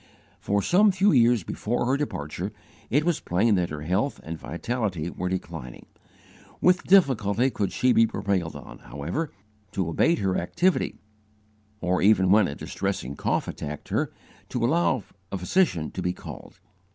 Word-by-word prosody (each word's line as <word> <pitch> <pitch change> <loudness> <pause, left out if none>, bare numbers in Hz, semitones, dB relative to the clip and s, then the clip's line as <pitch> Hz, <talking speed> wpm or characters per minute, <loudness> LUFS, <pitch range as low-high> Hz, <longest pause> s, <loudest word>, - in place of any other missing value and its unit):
For 100 0 0
some 205 +3 +5
few 190 +2 +3
years 120 - +4
before 120 +8 -2
her 130 +2 +2
departure, 95 - -3 0.4
it 145 +4 +2
was 175 -3 +1
plain 105 +6 +2
that 90 -3 +1
her 75 -1 -6
health 95 - 0
and 80 - -5
vitality 90 - -3
were 90 0 -3
declining. 65 -9 -6 0.7
With 180 +1 +3
difficulty 130 - +4
could 100 -4 -1
she 125 -1 +2
be 115 - +5
prevailed 95 -6 -2
on, - - -10
however, 85 - -4 0.4
to 95 -5 -1
abate 165 - +3
her 95 -6 0
activity, 185 0 +1 0.9
or, 90 0 +1
even 95 -2 +4
when 105 -2 +5
a 70 - -5
distressing 65 +3 -3
cough - - -1
attacked 75 0 -6
her, - - 0 0.4
to - - -1
allow 130 -4 +2 0.3
a 100 - -2
physician 90 - +1
to 95 - -5
be 90 0 0
called. - - -11
100 Hz, 155 wpm, -26 LUFS, 90-135 Hz, 0.9 s, some